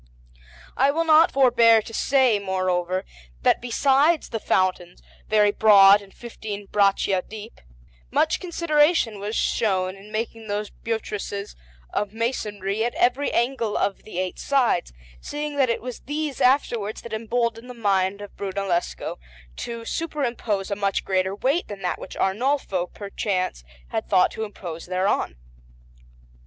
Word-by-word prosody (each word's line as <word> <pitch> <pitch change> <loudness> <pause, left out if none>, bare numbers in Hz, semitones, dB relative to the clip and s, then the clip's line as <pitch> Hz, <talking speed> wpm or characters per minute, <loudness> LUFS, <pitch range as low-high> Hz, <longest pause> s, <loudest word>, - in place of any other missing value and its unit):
I 270 +2 +3
will 320 +4 +1
not 320 +1 +6
forbear 235 -4 +5
to 225 - -10
say, 260 -4 +3
moreover, 185 -1 -1 0.4
that - - +3
besides 280 +6 +2
the 225 - -3
foundations, 185 -3 0 0.2
very 210 -1 +4
broad 205 -1 +7
and 195 -1 -15
fifteen 215 -3 -7
braccia 195 -2 +2
deep, 215 +3 -11 0.5
much - - +1
consideration 310 - +2
was 210 +3 -4
shown 190 -4 0
in 200 +2 -14
making 225 0 -4
those 205 0 -3
buttresses 210 -2 -4 0.4
of 210 0 -2
masonry 215 -3 -2
at 240 - -2
every 255 +4 +2
angle 235 -3 0
of 200 - -1
the 215 - -10
eight 185 0 -3
sides, 250 - +1 0.3
seeing 295 0 -4
that 265 -3 +3
it 230 - -1
was 250 -1 -6
these 295 -1 -4
afterwards 240 -5 +1
that 235 - -8
emboldened 230 +1 -2
the 250 - -8
mind 200 -3 +1
of 205 - -10
Brunellesco 195 - -3 0.4
to 235 -1 -6
superimpose 240 - -2
a - - +1
much 200 -1 -1
greater 190 0 0
weight 275 - 0
than 200 -2 -8
that 180 - -1
which - - -9
Arnolfo, 195 -3 0
perchance, 195 - -3 0.3
had - - -3
thought 185 -1 +4
to 220 - -4
impose 175 -6 -8
thereon. 185 - 0
215 Hz, 140 wpm, -24 LUFS, 195-245 Hz, 0.5 s, broad